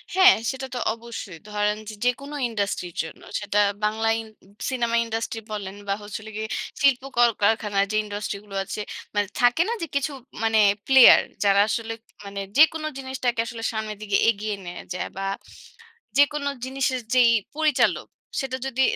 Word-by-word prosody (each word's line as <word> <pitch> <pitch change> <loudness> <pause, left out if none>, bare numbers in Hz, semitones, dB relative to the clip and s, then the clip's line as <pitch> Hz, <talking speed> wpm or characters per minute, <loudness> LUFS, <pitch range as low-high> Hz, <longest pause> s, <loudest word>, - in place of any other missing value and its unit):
হ্যাঁ, 375 0 +8 0.2
সেটা 265 0 -6
তো - - -2
অবশ্যই। 230 -6 -8
ধরেন 210 0 +1
যে - - -7
যেকোনো 275 +4 -1
ইন্ডাস্ট্রি 200 -5 -2
র - - -29
জন্য 160 - -10 0.2
সেটা 205 0 -2 0.3
বাংলা 220 +1 +1
ই - - -3 0.5
সিনেমা 235 -3 0
ইন্ডাস্ট্রি 225 0 -3
বলেন 200 -2 -5
বা 195 - +1
হচ্ছে 205 0 -6
হলো 220 0 -10
গিয়ে 220 +1 -4 0.3
শিল্প 275 -3 +4
কল 240 0 +6
কারখানার 205 -1 +2
যে - - -1
ইন্ডাস্ট্রি 205 0 -4
গুলো 200 -2 -10
আছে 210 - -5 0.3
মানে 205 -1 +1
থাকে 245 +6 +4
না - - 0
যে 335 - -2
কিছু 280 +2 0 0.3
মানে 225 -1 +3 0.3
প্লেয়ার। 265 -2 +9 0.2
যারা 200 -1 +4
আসলে 225 +1 -2 0.3
মানে 200 0 -6 0.2
যেকোনো 315 0 +5
জিনিসটাকে 260 -3 -2
আসলে 230 -1 -7
সামনের 215 -1 -4
দিকে 200 -2 +2
এগিয়ে 210 -1 -1
নেয়া 175 0 -7
যায়। 180 - -3
বা 195 - -2 0.9
যেকোনো 285 0 +3 0.2
জিনিসের 265 -1 -1
যেই 245 -2 +6 0.2
পরিচালক 305 -3 +2 0.3
সেটা 260 -1 -3
যদি 265 0 -1
225 Hz, 165 wpm, -24 LUFS, 205-265 Hz, 0.9 s, প্লেয়ার